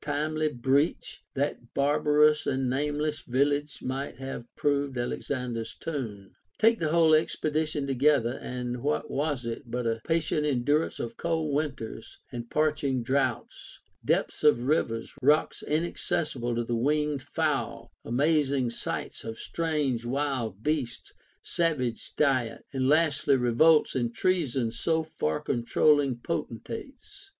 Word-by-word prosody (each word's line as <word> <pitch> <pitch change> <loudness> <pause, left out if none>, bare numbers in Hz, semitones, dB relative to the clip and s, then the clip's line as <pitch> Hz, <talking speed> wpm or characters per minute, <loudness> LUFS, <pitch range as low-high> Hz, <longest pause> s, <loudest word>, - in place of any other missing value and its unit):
477 155 0 -1
timely - - -12
breach, 135 +6 +1
that 140 -3 -2
barbarous 150 +1 +3
and 130 -1 0
nameless 150 +3 -1
village 145 +3 0
might 135 +2 -3
have 135 -2 -6
proved 140 -2 0
Alexander's 120 -1 -3
tomb. 115 -11 -5 0.3
3. 225 - +7
Take 230 - -3
the 155 - 0
whole 165 -1 +5
expedition 155 -1 +1
together, 135 -2 +2
and 125 -1 -4
what 150 +3 -1
was 140 -3 -1
it 115 +2 -5
but 120 +1 -2
a 115 -1 -1
patient 160 -2 0
endurance 145 +2 +1
of 115 0 -5
cold 160 -3 -1
winters 140 -7 -4
and 120 -1 -6
parching 150 -4 +1
droughts; 130 0 -2 0.3
depths - - 0
of 150 -6 +5
rivers, 120 -5 0
rocks 150 +4 +3
inaccessible 150 -5 -1
to 120 - 0
the 120 +1 -2
winged 150 +3 +1
fowl, 150 +1 -2
amazing 140 -1 +1
sights - - -4
of 115 0 -6
strange 150 -8 -1
wild 120 -5 -2
beasts, 145 -6 -2 0.3
sav 165 -4 +1
age 120 -3 -4
diet, 130 -6 +1
and 130 -1 0
lastly 150 -2 +3
revolts 135 +6 +4
and 120 -3 -1
treasons 135 -11 0
of 160 -1 +2
far 80 - -1
controlling 140 +3 +2
potentates. 275 - -6
140 Hz, 130 wpm, -28 LUFS, 120-150 Hz, 0.3 s, 3